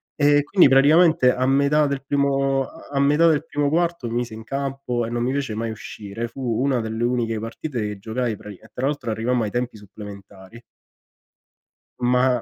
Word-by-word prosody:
Ehm, 145 Hz, -1 st, +4 dB
quindi 150 Hz, +2 st, +4 dB
praticamente 145 Hz, 0 st, +5 dB
a 130 Hz, +1 st, 0 dB
metà 140 Hz, +3 st, +3 dB
del 140 Hz, -1 st, -2 dB
primo 135 Hz, -1 st, +1 dB
a 160 Hz, +5 st, -13 dB
a 140 Hz, -, +1 dB
metà 150 Hz, +4 st, +4 dB
del 155 Hz, -1 st, +2 dB
primo 145 Hz, -2 st, -1 dB
quarto, 170 Hz, -4 st, 0 dB
mi 115 Hz, -, -4 dB
mise 120 Hz, -2 st, -2 dB
in 110 Hz, 0 st, -8 dB
campo 135 Hz, -2 st, -3 dB
e 115 Hz, -, -6 dB
non 120 Hz, 0 st, -2 dB
mi 125 Hz, +2 st, 0 dB
fece 135 Hz, -5 st, -2 dB
mai 115 Hz, +1 st, -3 dB
uscire. 110 Hz, 0 st, -6 dB
Fu 135 Hz, -, -10 dB, 0.2 s
una 135 Hz, -3 st, +1 dB
delle 110 Hz, +1 st, -3 dB
uniche 120 Hz, -2 st, 0 dB
partite 120 Hz, +4 st, -5 dB
che 105 Hz, -1 st, -4 dB
giocai 115 Hz, +2 st, -2 dB
prati 105 Hz, -2 st, -10 dB
e 110 Hz, +4 st, -19 dB
tra 130 Hz, +2 st, -1 dB
l'altro 140 Hz, -6 st, -2 dB
arrivammo 115 Hz, +2 st, 0 dB
ai 105 Hz, -, -3 dB
tempi 120 Hz, -2 st, -3 dB
supplementari 100 Hz, +1 st, -12 dB, 1.4 s
ma 125 Hz, 0 st, +2 dB
125 Hz, 190 wpm, -22 LUFS, 115-140 Hz, 1.4 s, praticamente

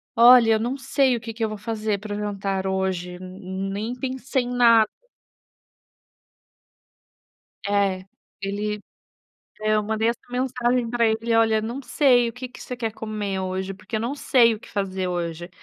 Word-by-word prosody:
"Olha, 235 Hz, -1 st, +8 dB
eu 220 Hz, -, +2 dB
não 240 Hz, +4 st, -1 dB
sei 270 Hz, -1 st, +2 dB
o -, -, -3 dB
que 225 Hz, 0 st, -7 dB
que 225 Hz, +1 st, -4 dB
eu -, -, -2 dB
vou 215 Hz, -, -5 dB
fazer 215 Hz, -1 st, -2 dB
para 210 Hz, +1 st, -6 dB
o -, -, -4 dB
jantar 195 Hz, -2 st, -2 dB
hoje, 190 Hz, -2 st, -2 dB
ne 190 Hz, +1 st, -6 dB
nem 210 Hz, +4 st, -3 dB
pensei 260 Hz, +1 st, -2 dB
em 245 Hz, -, -5 dB
nada". 230 Hz, -3 st, +6 dB, 2.8 s
É. 200 Hz, -2 st, +1 dB, 0.4 s
Ele 205 Hz, +2 st, -2 dB, 0.8 s
é, 215 Hz, 0 st, +2 dB
eu 210 Hz, -, +2 dB
mandei 220 Hz, +1 st, 0 dB
essa 235 Hz, -, -1 dB
mensagem 250 Hz, -1 st, 0 dB
pra 235 Hz, -1 st, +2 dB
ele: 225 Hz, +1 st, 0 dB
"Olha, 225 Hz, -1 st, +4 dB
não 235 Hz, +5 st, -4 dB
sei, 250 Hz, -3 st, +3 dB
o -, -, -6 dB
que 250 Hz, +2 st, -7 dB
que 250 Hz, -, -14 dB
você 250 Hz, -, -6 dB
quer 225 Hz, -2 st, -3 dB
comer 210 Hz, -3 st, -4 dB
hoje? 190 Hz, +1 st, -3 dB
Porque 195 Hz, +4 st, -11 dB
eu -, -, -1 dB
não 240 Hz, +5 st, -2 dB
sei 235 Hz, -5 st, +4 dB
o -, -, -8 dB
que -, -, -14 dB
fazer 190 Hz, -2 st, -2 dB
hoje". 175 Hz, -1 st, -3 dB
220 Hz, 175 wpm, -24 LUFS, 195-240 Hz, 2.8 s, Olha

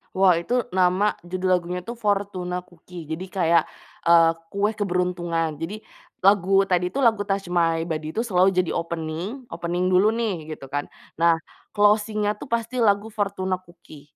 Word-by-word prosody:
Wah, 185 Hz, -3 st, +5 dB
itu 205 Hz, +8 st, -4 dB, 0.2 s
nama 185 Hz, +3 st, +3 dB, 0.2 s
judul 185 Hz, +1 st, -2 dB
lagunya 180 Hz, +1 st, -5 dB
tuh, 235 Hz, +2 st, -6 dB
"Fortuna 195 Hz, -4 st, -1 dB
Cookie." 175 Hz, -1 st, -12 dB
Jadi 170 Hz, +4 st, -4 dB
kayak, 170 Hz, -4 st, +2 dB, 0.4 s
eee, 165 Hz, -1 st, +6 dB, 0.2 s
kue 205 Hz, +2 st, +1 dB
keberuntungan. 175 Hz, -5 st, -1 dB
Jadi 205 Hz, +7 st, -5 dB, 0.4 s
lagu 195 Hz, 0 st, +5 dB
tadi 180 Hz, -1 st, +1 dB
tuh 275 Hz, -, -1 dB
lagu 220 Hz, -3 st, +4 dB
Touch 195 Hz, 0 st, -1 dB
My 165 Hz, -2 st, +2 dB
Body 155 Hz, -2 st, -4 dB
itu 225 Hz, -, +1 dB
selalu 190 Hz, -3 st, +4 dB
jadi 180 Hz, -2 st, +1 dB
opening, 170 Hz, -, -4 dB
opening 175 Hz, +1 st, -2 dB
dulu 190 Hz, +4 st, +5 dB
nih 205 Hz, -9 st, -2 dB
gitu 150 Hz, -3 st, -7 dB
kan 145 Hz, +2 st, -4 dB, 0.2 s
nah 165 Hz, 0 st, +3 dB, 0.4 s
closing-nya 210 Hz, 0 st, +3 dB
tuh 210 Hz, -, -11 dB
pasti 235 Hz, +1 st, -1 dB
lagu 205 Hz, -1 st, +3 dB
Fortuna 190 Hz, -3 st, -2 dB
cookie. 170 Hz, -4 st, -16 dB
185 Hz, 155 wpm, -24 LUFS, 170-205 Hz, 0.4 s, eee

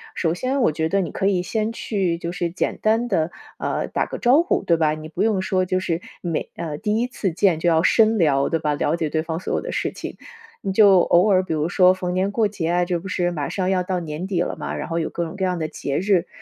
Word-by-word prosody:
首 165 Hz, -2 st, 0 dB
先 260 Hz, +9 st, -1 dB
我 200 Hz, -, +3 dB
觉 160 Hz, +1 st, -1 dB
得 195 Hz, +2 st, +2 dB
你 170 Hz, -, -4 dB
可 195 Hz, -, -1 dB
以 185 Hz, -3 st, +1 dB
先 215 Hz, +3 st, -1 dB
去 195 Hz, -7 st, -1 dB
就 170 Hz, 0 st, -4 dB
是 175 Hz, -1 st, -2 dB
简 175 Hz, -, -2 dB
单 225 Hz, +3 st, +2 dB
地， 165 Hz, -7 st, +1 dB, 0.3 s
啊， -, -, -2 dB
打 -, -, -1 dB
个 -, -, -6 dB
招 260 Hz, +6 st, +4 dB
呼， 345 Hz, -, 0 dB
对 175 Hz, -3 st, +3 dB
吧？ 155 Hz, -2 st, +2 dB
你 155 Hz, 0 st, -7 dB
不 160 Hz, -, -5 dB
用 215 Hz, -4 st, +2 dB
说 185 Hz, 0 st, 0 dB
就 185 Hz, 0 st, 0 dB
是， 170 Hz, -2 st, -2 dB, 0.2 s
每 170 Hz, -3 st, -3 dB
呃， 160 Hz, -3 st, -4 dB
第 210 Hz, +3 st, 0 dB
一 245 Hz, -, 0 dB
次 210 Hz, -6 st, -2 dB
见 180 Hz, -1 st, +2 dB
就 175 Hz, -, +2 dB
要 165 Hz, 0 st, +3 dB
深 220 Hz, +2 st, +4 dB
聊， 140 Hz, -6 st, +2 dB
对 165 Hz, -, 0 dB
吧？ 150 Hz, -1 st, 0 dB
了 145 Hz, +2 st, 0 dB
解 160 Hz, -2 st, -2 dB
对 155 Hz, +1 st, 0 dB
方 160 Hz, 0 st, -4 dB
所 -, -, -4 dB
有 -, -, 0 dB
的 -, -, -5 dB
事 -, -, -1 dB
情。 -, -, -8 dB, 0.5 s
你 195 Hz, -, -1 dB
就 195 Hz, -2 st, +6 dB
偶 175 Hz, +3 st, +4 dB
尔 190 Hz, -3 st, +4 dB
比 180 Hz, -4 st, -3 dB
如 155 Hz, +1 st, 0 dB
说 180 Hz, 0 st, +5 dB
逢 185 Hz, -1 st, -2 dB
年 190 Hz, +2 st, 0 dB
过 220 Hz, 0 st, +2 dB
节 185 Hz, -5 st, -3 dB
啊， 175 Hz, +1 st, +2 dB
这 175 Hz, -1 st, -1 dB
不 185 Hz, -, -9 dB
是 175 Hz, -1 st, 0 dB
马 150 Hz, -5 st, -3 dB
上 190 Hz, -1 st, -1 dB
要 185 Hz, -1 st, +2 dB
到 180 Hz, 0 st, -2 dB
年 165 Hz, +2 st, -5 dB
底 185 Hz, -3 st, 0 dB
了 -, -, -2 dB
吗， -, -, -4 dB
然 -, -, -4 dB
后 165 Hz, 0 st, -1 dB
有 160 Hz, -, -2 dB
各 170 Hz, -, -3 dB
种 160 Hz, -, -7 dB
各 195 Hz, -, -3 dB
样 180 Hz, -1 st, 0 dB
的 160 Hz, -2 st, -2 dB
节 145 Hz, -2 st, -3 dB
日。 185 Hz, -2 st, +2 dB
180 Hz, 300 characters per minute, -22 LUFS, 165-195 Hz, 0.5 s, 就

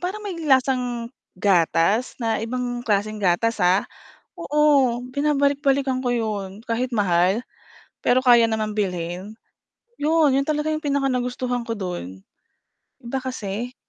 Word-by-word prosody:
parang 395 Hz, +4 st, -4 dB
may 370 Hz, -5 st, -5 dB
lasang 250 Hz, -4 st, +1 dB, 0.2 s
gatas 185 Hz, +4 st, +2 dB
na 225 Hz, -3 st, -1 dB
ibang 245 Hz, +1 st, -3 dB
klaseng 215 Hz, -2 st, -1 dB
gatas, 205 Hz, +4 st, +1 dB
ha. 180 Hz, +2 st, +3 dB, 0.5 s
Oo, 285 Hz, -5 st, +2 dB
binabalik-balikan 280 Hz, -1 st, +1 dB
ko 245 Hz, -, +1 dB
'yon, 210 Hz, -4 st, -3 dB
kahit 245 Hz, +2 st, -1 dB
mahal, 190 Hz, -1 st, +2 dB, 0.6 s
pero 255 Hz, +1 st, +2 dB
kaya 240 Hz, -2 st, +6 dB
naman 220 Hz, -1 st, -1 dB
bilhin. 185 Hz, 0 st, -3 dB, 0.6 s
'Yon, 310 Hz, 0 st, +3 dB
'yon 275 Hz, -, -2 dB
talaga 305 Hz, 0 st, 0 dB
yung 310 Hz, +1 st, -3 dB
pinaka 280 Hz, -2 st, 0 dB
nagustuhan 250 Hz, -1 st, -2 dB
ko 230 Hz, -, -2 dB
don. 175 Hz, -, -6 dB, 0.8 s
Iba 240 Hz, +2 st, -4 dB
kasi. 245 Hz, -2 st, -5 dB
240 Hz, 125 wpm, -23 LUFS, 205-270 Hz, 0.8 s, kaya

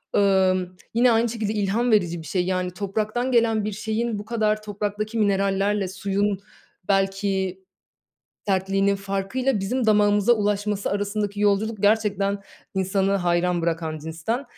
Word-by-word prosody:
ımm, 185 Hz, -2 st, +2 dB, 0.2 s
yine 240 Hz, +1 st, +4 dB
aynı 230 Hz, +1 st, +2 dB
şekilde 220 Hz, -2 st, -2 dB
ilham 215 Hz, +4 st, 0 dB
verici 175 Hz, -6 st, +2 dB
bir 160 Hz, -, -10 dB
şey. 180 Hz, +3 st, 0 dB
Yani, 185 Hz, -1 st, -1 dB
topraktan 215 Hz, +6 st, -2 dB
gelen 225 Hz, -3 st, +2 dB
bir 215 Hz, -, -2 dB
şeyin 220 Hz, +1 st, -2 dB
bu 205 Hz, -, -8 dB
kadar 215 Hz, -1 st, 0 dB
topraktaki 210 Hz, +1 st, -3 dB
minerallerle 200 Hz, -1 st, +1 dB
suyun, 200 Hz, +1 st, -1 dB, 0.5 s
belki, 195 Hz, -1 st, 0 dB, 0.9 s
sertliğinin 195 Hz, +1 st, +1 dB
farkıyla 200 Hz, +5 st, -1 dB
bizim 235 Hz, +5 st, -1 dB
damağımıza 210 Hz, +1 st, +4 dB
ulaşması 205 Hz, -2 st, 0 dB
arasındaki 205 Hz, 0 st, -2 dB
yolculuk 210 Hz, +1 st, +1 dB
gerçekten 205 Hz, -2 st, +2 dB, 0.4 s
insanı 190 Hz, +1 st, +1 dB
hayran 175 Hz, -2 st, +1 dB
bırakan 165 Hz, -2 st, -2 dB
cinsten. 165 Hz, -, -3 dB
200 Hz, 130 wpm, -24 LUFS, 190-215 Hz, 0.9 s, yine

